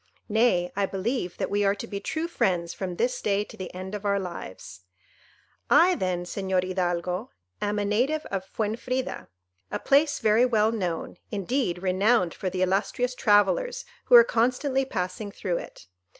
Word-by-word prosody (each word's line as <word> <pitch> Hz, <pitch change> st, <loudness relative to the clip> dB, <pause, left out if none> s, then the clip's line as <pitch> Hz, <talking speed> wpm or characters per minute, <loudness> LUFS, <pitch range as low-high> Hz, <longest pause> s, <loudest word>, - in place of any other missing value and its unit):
Nay, 210 Hz, -5 st, +2 dB
I 200 Hz, 0 st, +1 dB
believe 195 Hz, -1 st, -2 dB
that -, -, -2 dB
we 205 Hz, 0 st, +2 dB
are 200 Hz, 0 st, +3 dB
to 205 Hz, -, -6 dB
be 200 Hz, -3 st, -5 dB
true 315 Hz, +9 st, -3 dB
friends 175 Hz, -, 0 dB
from 185 Hz, -2 st, -4 dB
this 245 Hz, +5 st, -1 dB
day 205 Hz, 0 st, +1 dB
to -, -, -13 dB
the 185 Hz, -2 st, -7 dB
end 185 Hz, +2 st, -7 dB
of 210 Hz, -1 st, -5 dB
our 200 Hz, -1 st, +1 dB
lives. 100 Hz, -, -8 dB, 0.9 s
"I, 365 Hz, +2 st, +6 dB
then, 185 Hz, -, -1 dB
Señor 190 Hz, 0 st, -1 dB
Hidalgo, 180 Hz, +3 st, -2 dB, 0.3 s
am 205 Hz, 0 st, -1 dB
a 205 Hz, -, 0 dB
native 255 Hz, +10 st, +1 dB
of 195 Hz, -1 st, -2 dB
Fuenfrida, 230 Hz, +6 st, -3 dB, 0.4 s
a -, -, -2 dB
place 285 Hz, +2 st, +3 dB
very 220 Hz, +2 st, +3 dB
well 220 Hz, -3 st, +3 dB
known, 180 Hz, -7 st, -3 dB
indeed 200 Hz, -3 st, -1 dB
renowned 190 Hz, 0 st, +2 dB
for 185 Hz, -, -3 dB
the 185 Hz, 0 st, -1 dB
illustrious 200 Hz, +7 st, 0 dB
travellers 485 Hz, -, +2 dB, 0.2 s
who -, -, +6 dB
are 475 Hz, -, +11 dB
constantly 265 Hz, -, +1 dB
passing 185 Hz, -2 st, -3 dB
through 185 Hz, -3 st, -2 dB
it. -, -, -11 dB
205 Hz, 165 wpm, -26 LUFS, 185-245 Hz, 0.9 s, are